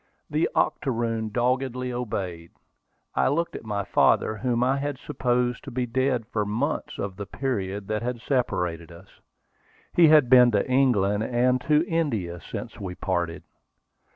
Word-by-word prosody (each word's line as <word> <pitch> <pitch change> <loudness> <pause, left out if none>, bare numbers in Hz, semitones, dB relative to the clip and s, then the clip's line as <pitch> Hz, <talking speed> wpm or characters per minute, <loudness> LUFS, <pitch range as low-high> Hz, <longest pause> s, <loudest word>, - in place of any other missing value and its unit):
The 155 +2 +1
octoroon 115 -6 0
doggedly 125 +2 -1
obeyed. 95 -8 -4 0.6
I - - +2
looked 165 +5 0
at - - -7
my 105 -2 -2
father, 110 - +3
whom 120 +1 0
I 130 +2 +2
had 145 0 -3
supposed 125 -3 -1
to - - -6
be 125 0 -2
dead 130 -1 0
for 105 - +1
months 120 +9 -2
of 100 -2 -4
the 100 -1 -6
period 100 -6 -3
that 110 0 -1
had 120 0 -3
separated 90 - -1
us. 85 +3 -16 0.7
He 170 -2 +6
had 150 -4 +6
been 125 -1 +7
to 100 - +1
England 115 -6 +2
and 125 +2 +1
to 155 +2 +4
India 110 - -1
since - - -7
we 95 -2 -5
parted. 85 -4 -2
120 Hz, 155 wpm, -25 LUFS, 100-130 Hz, 0.7 s, been